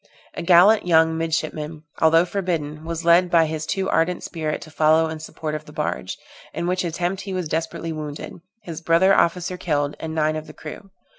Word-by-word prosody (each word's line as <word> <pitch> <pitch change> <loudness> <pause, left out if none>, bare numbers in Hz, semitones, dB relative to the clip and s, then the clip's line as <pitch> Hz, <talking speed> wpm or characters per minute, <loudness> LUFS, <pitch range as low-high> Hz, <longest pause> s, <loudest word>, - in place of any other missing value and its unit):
A - - -5
gallant 180 +4 +5
young 160 -1 +4
midshipman, 160 -1 -3 0.2
although 165 +2 +5
forbidden, 165 -5 -3
was 165 0 -4
led 175 +1 +5
by 165 -2 +4
his 155 0 -4
too 190 -1 -1
ardent 170 +2 +1
spirit 155 -2 -3
to 155 - -13
follow 155 +1 +3
in 160 0 -6
support 155 0 -6
of 155 - -5
the - - -13
barge, 65 - -3 0.4
in 170 - -2
which 180 +1 0
attempt 175 +3 -2
he 195 -2 -6
was 180 -3 -2
desperately 165 +1 -3
wounded, 155 +2 -7 0.2
his 165 -4 -7
brother 170 +4 +4
officer 180 0 +1
killed, 145 -4 -1
and 160 0 -5
nine 155 0 +1
of 155 0 -6
the - - -11
crew. 160 +6 -10
165 Hz, 195 wpm, -22 LUFS, 155-175 Hz, 0.4 s, gallant